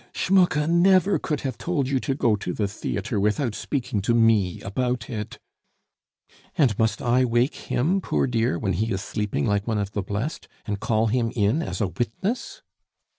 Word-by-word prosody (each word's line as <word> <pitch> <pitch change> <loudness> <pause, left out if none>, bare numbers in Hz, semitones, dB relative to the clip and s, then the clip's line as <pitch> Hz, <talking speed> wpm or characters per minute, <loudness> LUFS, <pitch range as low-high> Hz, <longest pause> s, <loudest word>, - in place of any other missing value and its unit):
"Schmucke 180 -5 +3
never 185 +3 +4
could 150 -3 -2
have 130 -4 -4
told 155 -7 -1
you 135 0 +1
to 135 +1 -2
go 115 -5 +2
to 95 -3 -4
the 105 - -1
theatre 100 +1 -3
without 105 +4 +1
speaking 125 -4 -2
to 115 +4 +1
me 110 -6 +3
about 125 +3 -2
it 105 -3 -5 0.6
" - - -32
"And 130 -9 +3
must 110 -2 +1
I 125 +1 +3
wake 120 +3 +2
him, 175 +10 0
poor - - 0
dear, 115 -7 0
when 95 +1 -1
he 110 +6 -1
is 95 0 -2
sleeping 105 -9 -2
like 100 +1 0
one 110 -2 0
of 100 -1 -2
the 105 - -2
blest, 105 - -4 0.2
and 100 -2 -3
call 110 +1 +1
him 115 0 0
in 110 +8 +2
as 170 - -4
a 100 - +2
witness?" 190 - -3
115 Hz, 185 wpm, -24 LUFS, 105-140 Hz, 0.6 s, never